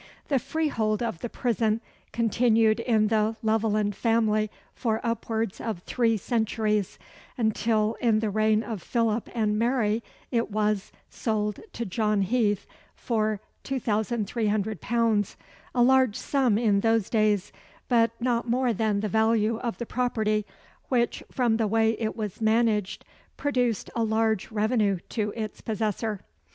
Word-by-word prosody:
The 275 Hz, -3 st, +3 dB
freehold 240 Hz, -9 st, -1 dB
of 210 Hz, -8 st, -3 dB
the 240 Hz, -, -4 dB
prison 225 Hz, -2 st, 0 dB, 0.3 s
continued 230 Hz, -1 st, +3 dB
in 220 Hz, -3 st, +2 dB
the 220 Hz, 0 st, +1 dB
Leveland 215 Hz, -2 st, +1 dB
family 215 Hz, -2 st, +2 dB, 0.2 s
for 225 Hz, -3 st, -1 dB
upwards 230 Hz, -3 st, -2 dB
of 215 Hz, -6 st, -4 dB
three 230 Hz, -2 st, +1 dB
centuries; 215 Hz, -2 st, 0 dB, 0.4 s
until, 220 Hz, -1 st, +1 dB
in 230 Hz, -3 st, +3 dB
the 215 Hz, -1 st, 0 dB
reign 215 Hz, +1 st, +2 dB
of 220 Hz, -6 st, -5 dB
Philip 230 Hz, -2 st, 0 dB
and 210 Hz, -2 st, +1 dB
Mary 230 Hz, -2 st, +1 dB, 0.3 s
it 235 Hz, -2 st, 0 dB
was, 210 Hz, -1 st, 0 dB, 0.2 s
sold 210 Hz, -2 st, -1 dB
to 235 Hz, -, -3 dB
John 210 Hz, +1 st, +1 dB
Heath 210 Hz, -1 st, +1 dB, 0.3 s
for 215 Hz, -3 st, -1 dB, 0.2 s
£2300 220 Hz, -, 0 dB, 0.4 s
a 245 Hz, -, +5 dB
large 260 Hz, -3 st, +4 dB
sum 260 Hz, -7 st, +1 dB
in 215 Hz, -3 st, +3 dB
those 225 Hz, -1 st, +2 dB
days, 210 Hz, -3 st, +1 dB, 0.3 s
but 230 Hz, -2 st, +4 dB
not 235 Hz, -1 st, 0 dB
more 250 Hz, 0 st, +2 dB
than 210 Hz, -1 st, 0 dB
the 215 Hz, -, -1 dB
value 220 Hz, +1 st, +2 dB
of 235 Hz, -2 st, -3 dB
the 235 Hz, -, -4 dB
property, 220 Hz, -4 st, 0 dB, 0.4 s
which 240 Hz, -3 st, +1 dB
from 240 Hz, -4 st, +2 dB
the 225 Hz, -2 st, +1 dB
way 225 Hz, +1 st, +3 dB
it 220 Hz, -1 st, -2 dB
was 215 Hz, -2 st, -5 dB
managed 220 Hz, -3 st, +1 dB, 0.3 s
produced 250 Hz, -6 st, 0 dB
a 230 Hz, -, +1 dB
large 220 Hz, -2 st, +1 dB
revenue 215 Hz, -2 st, +1 dB
to 210 Hz, -3 st, -1 dB
its 215 Hz, -2 st, -5 dB
possessor. 215 Hz, -1 st, -2 dB
220 Hz, 135 wpm, -26 LUFS, 215-235 Hz, 0.4 s, a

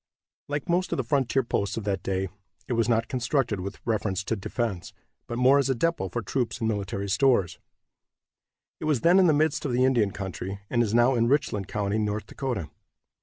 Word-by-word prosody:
Like 145 Hz, -1 st, -3 dB
most 180 Hz, +2 st, +1 dB
of -, -, 0 dB
the 130 Hz, -, 0 dB
frontier 135 Hz, +1 st, +1 dB
posts 100 Hz, -3 st, -1 dB
of 115 Hz, -, -3 dB
that 100 Hz, -1 st, -1 dB
day, 95 Hz, 0 st, -1 dB, 0.4 s
it -, -, -1 dB
was 115 Hz, 0 st, +1 dB
not 115 Hz, -1 st, +2 dB
constructed 125 Hz, -4 st, 0 dB
with 95 Hz, +2 st, -6 dB
reference 105 Hz, -4 st, -1 dB
to 115 Hz, -, -1 dB
defense, 100 Hz, -2 st, -3 dB, 0.3 s
but 120 Hz, -, -4 dB
more 130 Hz, +3 st, +5 dB
as 135 Hz, -, +1 dB
a 135 Hz, -, +2 dB
depot 120 Hz, -, 0 dB
for 115 Hz, +6 st, -3 dB
troops 120 Hz, +4 st, -2 dB
and 115 Hz, -, -1 dB
military 100 Hz, -2 st, -2 dB
stores. 105 Hz, -5 st, +2 dB, 1.2 s
It -, -, -5 dB
was 150 Hz, -6 st, +1 dB
then 175 Hz, +3 st, +5 dB
in 185 Hz, -, +5 dB
the -, -, +5 dB
midst 155 Hz, 0 st, +1 dB
of 135 Hz, -, -2 dB
the 125 Hz, +1 st, +3 dB
Indian 120 Hz, -6 st, +3 dB
country, 95 Hz, 0 st, -5 dB
and 120 Hz, -, +2 dB
is 115 Hz, -1 st, 0 dB
now 120 Hz, +2 st, +5 dB
in 115 Hz, -1 st, +2 dB
Richland 120 Hz, -8 st, 0 dB
county, 105 Hz, 0 st, -1 dB
North 105 Hz, -1 st, -2 dB
Dakota. 115 Hz, -, -4 dB
115 Hz, 205 wpm, -26 LUFS, 100-135 Hz, 1.2 s, more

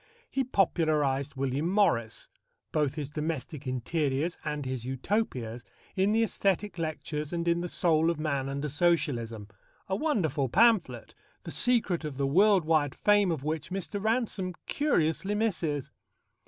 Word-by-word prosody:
He 270 Hz, -, +1 dB
popularized 155 Hz, -, +1 dB
William 135 Hz, +4 st, -1 dB
Morris, 115 Hz, -, +1 dB, 0.4 s
both 150 Hz, -2 st, 0 dB
his 150 Hz, -3 st, -3 dB
domestic 150 Hz, -1 st, -4 dB
interiors 140 Hz, +5 st, -1 dB
and 150 Hz, -2 st, -3 dB
his 130 Hz, -2 st, -3 dB
Utopias, 130 Hz, -, -2 dB, 0.3 s
in 195 Hz, +2 st, +2 dB
the 225 Hz, +1 st, +3 dB
æsthetic 200 Hz, -3 st, -1 dB
lectures 155 Hz, -2 st, -3 dB
and 170 Hz, -1 st, -2 dB
in 170 Hz, 0 st, +2 dB
The 175 Hz, -, -3 dB
Soul 165 Hz, -2 st, +2 dB
of 170 Hz, -3 st, -1 dB
Man 140 Hz, -3 st, -1 dB
under 140 Hz, +2 st, -3 dB
Socialism 130 Hz, -9 st, 0 dB, 0.4 s
a 190 Hz, -, 0 dB
wonderful 170 Hz, -, 0 dB
pamphlet, 225 Hz, -, +3 dB, 0.3 s
the -, -, -7 dB
secret 230 Hz, -9 st, +2 dB
of 150 Hz, -3 st, -5 dB
the 140 Hz, -, 0 dB
world 190 Hz, +5 st, +4 dB
wide 155 Hz, -3 st, +2 dB
fame 205 Hz, -2 st, +3 dB
of 155 Hz, -5 st, -3 dB
which 155 Hz, 0 st, -3 dB
Mr. 195 Hz, +2 st, -4 dB
Ransome 215 Hz, -5 st, -1 dB
curiously 200 Hz, -, +1 dB
misses. 170 Hz, -, -1 dB
160 Hz, 140 wpm, -29 LUFS, 140-195 Hz, 0.4 s, world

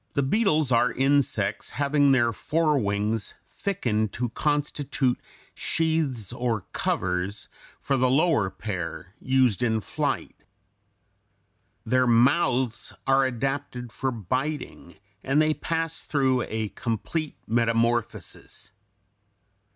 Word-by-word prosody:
199) 155 Hz, -, +2 dB
are 120 Hz, +1 st, +3 dB
insects 140 Hz, +1 st, +1 dB
having 145 Hz, 0 st, +3 dB
their 120 Hz, -3 st, +3 dB
fore 155 Hz, +2 st, +1 dB
wings 105 Hz, 0 st, -1 dB, 0.2 s
thickened 110 Hz, -, -1 dB
to 120 Hz, +2 st, -2 dB
constitute 145 Hz, -1 st, 0 dB, 0.3 s
sheaths 155 Hz, -, -1 dB
or 120 Hz, -4 st, -1 dB
covers 95 Hz, +3 st, -1 dB, 0.3 s
for 135 Hz, -, 0 dB
the 130 Hz, 0 st, +3 dB
lower 140 Hz, -, +3 dB
pair, 95 Hz, -2 st, -5 dB
used 130 Hz, -4 st, +2 dB
in 110 Hz, -2 st, +2 dB
flight. -, -, -2 dB, 1.5 s
Their 125 Hz, +2 st, +3 dB
mouths 125 Hz, 0 st, +2 dB
are 135 Hz, 0 st, +4 dB
adapted 130 Hz, -1 st, -3 dB
for 130 Hz, +5 st, -2 dB
biting, 130 Hz, -, -4 dB, 0.3 s
and 135 Hz, +3 st, +2 dB
they 155 Hz, 0 st, +3 dB
pass 165 Hz, 0 st, -2 dB
through 130 Hz, -4 st, +1 dB
a 110 Hz, -1 st, -2 dB
complete 115 Hz, +9 st, -3 dB
metamorphosis. 115 Hz, 0 st, -1 dB
125 Hz, 100 wpm, -26 LUFS, 115-145 Hz, 1.5 s, are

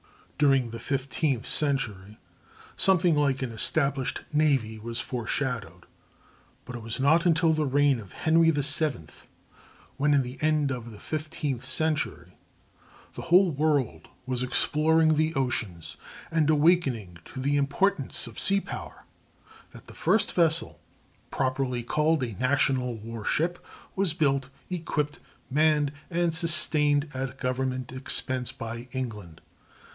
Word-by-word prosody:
During 135 Hz, -5 st, +3 dB
the 115 Hz, -, -7 dB
fifteenth 135 Hz, -2 st, -2 dB
century 110 Hz, -9 st, -2 dB, 0.6 s
something 185 Hz, -3 st, +4 dB
like 140 Hz, -3 st, +1 dB
an 125 Hz, -, -4 dB
established 140 Hz, +3 st, 0 dB
navy 135 Hz, -8 st, +1 dB
was 115 Hz, +2 st, -5 dB
foreshadowed; 115 Hz, -7 st, -3 dB, 0.8 s
but 125 Hz, -, -8 dB
it 120 Hz, -, -7 dB
was 115 Hz, +3 st, -4 dB
not 160 Hz, +6 st, +3 dB
until 165 Hz, -1 st, +3 dB
the 155 Hz, -2 st, 0 dB
reign 140 Hz, -1 st, +2 dB
of 100 Hz, -5 st, -12 dB
Henry 165 Hz, +1 st, +3 dB
VII, 145 Hz, -, +1 dB, 0.9 s
when, 145 Hz, +1 st, +2 dB
at 140 Hz, -, +3 dB
the 125 Hz, +1 st, -8 dB
end 150 Hz, -2 st, +1 dB
of 120 Hz, -3 st, -5 dB
the 105 Hz, -3 st, -12 dB
fifteenth 150 Hz, -4 st, -4 dB
century, 135 Hz, -, -2 dB, 0.8 s
the -, -, -7 dB
whole 180 Hz, +1 st, +4 dB
world 140 Hz, -, 0 dB, 0.2 s
was 125 Hz, -1 st, -2 dB
exploring 155 Hz, +5 st, +2 dB
the 155 Hz, +1 st, 0 dB
oceans 110 Hz, -10 st, -2 dB, 0.3 s
and 160 Hz, -2 st, +2 dB
awakening 145 Hz, -, +2 dB
to -, -, -9 dB
the 140 Hz, +2 st, 0 dB
importance 145 Hz, +3 st, +1 dB
of 115 Hz, -3 st, -7 dB
sea 195 Hz, 0 st, +4 dB
power, -, -, -9 dB, 0.7 s
that -, -, -13 dB
the -, -, -13 dB
first 220 Hz, -, +2 dB
vessel, 165 Hz, -2 st, +2 dB, 0.5 s
properly 130 Hz, -2 st, -1 dB
called 150 Hz, +3 st, +1 dB
a 115 Hz, -3 st, -4 dB
national 130 Hz, -2 st, +1 dB
war 115 Hz, 0 st, -8 dB
ship, 175 Hz, +9 st, -1 dB, 0.3 s
was 190 Hz, -5 st, 0 dB
built, 140 Hz, -5 st, 0 dB, 0.2 s
equipped, 155 Hz, -4 st, -2 dB, 0.3 s
manned, 150 Hz, 0 st, +2 dB, 0.2 s
and 170 Hz, -1 st, 0 dB
sustained 155 Hz, -3 st, +4 dB
at 130 Hz, 0 st, -4 dB
government 130 Hz, -1 st, -2 dB
expense 130 Hz, -1 st, 0 dB
by 115 Hz, +1 st, -7 dB
England. 105 Hz, -11 st, -6 dB
140 Hz, 130 wpm, -27 LUFS, 125-155 Hz, 0.9 s, something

